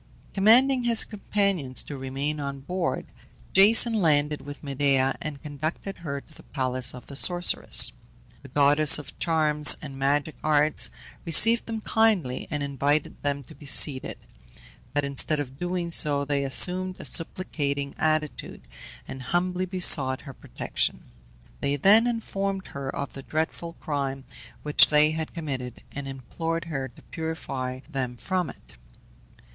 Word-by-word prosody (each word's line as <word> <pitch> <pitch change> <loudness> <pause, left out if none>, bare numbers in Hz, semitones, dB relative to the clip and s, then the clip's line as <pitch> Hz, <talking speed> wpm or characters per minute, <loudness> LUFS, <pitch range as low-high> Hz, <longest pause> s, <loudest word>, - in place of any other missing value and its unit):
Commanding 245 +6 +4
his 235 -2 +5
companions 200 - -1
to 145 - -8
remain 135 +3 -4
on 140 -1 -5
board, 175 -1 -3 0.5
Jason 225 +4 +6
landed 150 -7 +1
with 145 +2 -10
Medea, 135 -1 0
and 155 -3 -7
conducted 155 +6 -5
her 140 -4 -5
to 160 - -19
the - - -15
palace 130 -2 -1
of 125 - -12
the 140 - -11
sorceress. 175 +5 +4 0.5
The 140 - -13
goddess 145 +3 +6
of 150 - -11
charms 150 -2 +4
and 135 -3 -9
magic 145 +2 0
arts 150 0 +2 0.3
received 225 +8 +3
them 225 -1 -5
kindly, 210 - 0
and 150 -2 -3
invited 140 +2 -2
them 140 -1 -3
to 155 - -15
be 150 - -14
seated; 135 0 +3 0.7
but 145 +1 -1
instead 140 +2 0
of 135 -1 -7
doing 175 -1 -3
so 145 -3 +4
they 140 -1 -1
assumed 185 +7 +4
a - - -10
supplicating 145 -5 -1
attitude, 155 -1 -2 0.5
and 130 - -8
humbly 180 +6 -2
besought 145 -8 +4
her 140 - -11
protection. - - -4 0.5
They 140 0 -1
then 210 - +5
informed 195 -4 -3
her 140 -1 -6
of 140 +1 -5
the 135 - -9
dreadful 160 +3 -4
crime 140 -4 -4 0.4
which 150 0 +5
they 150 +1 +3
had 160 +1 -5
committed, 135 -7 -6
and 140 -1 -7
implored 165 +6 -5
her 135 -5 -4
to 120 - -19
purify 135 -6 -6
them 130 -5 -5
from 180 +3 -2
it. - - -15
150 Hz, 145 wpm, -25 LUFS, 140-175 Hz, 0.7 s, Jason